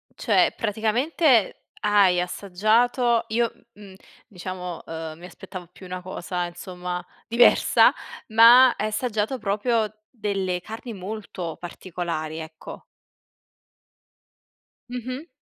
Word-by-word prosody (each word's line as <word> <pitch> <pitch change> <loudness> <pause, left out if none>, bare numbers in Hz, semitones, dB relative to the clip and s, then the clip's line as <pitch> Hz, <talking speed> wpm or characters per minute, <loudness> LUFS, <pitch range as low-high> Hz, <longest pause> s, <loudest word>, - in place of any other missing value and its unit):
Cioè, - - +2
praticamente 230 - +1 0.2
hai 200 -4 +4
assaggiato 225 +7 +1
io, 230 +1 0 0.2
m 210 - -17
mhmm, 195 -2 -12 0.3
diciamo, 180 -2 -6
uhm, 160 -1 -6
mi 175 - -11
aspettavo 180 -1 -10
più 185 - -14
una 180 0 -6
cosa, 180 -1 -4
insomma, 180 0 -6 0.2
diversa, 235 +1 +5 0.3
ma 235 +3 +8
hai 215 - -2
assaggiato 220 +2 -1
proprio 215 +1 0 0.2
delle 195 -6 -2
carni 225 +1 -8
molto 190 -4 -6
particolari, 170 -3 -5
ecco. 160 0 -10 2.1
Mh-mh. 255 +5 -6
205 Hz, 100 wpm, -24 LUFS, 180-230 Hz, 2.1 s, ma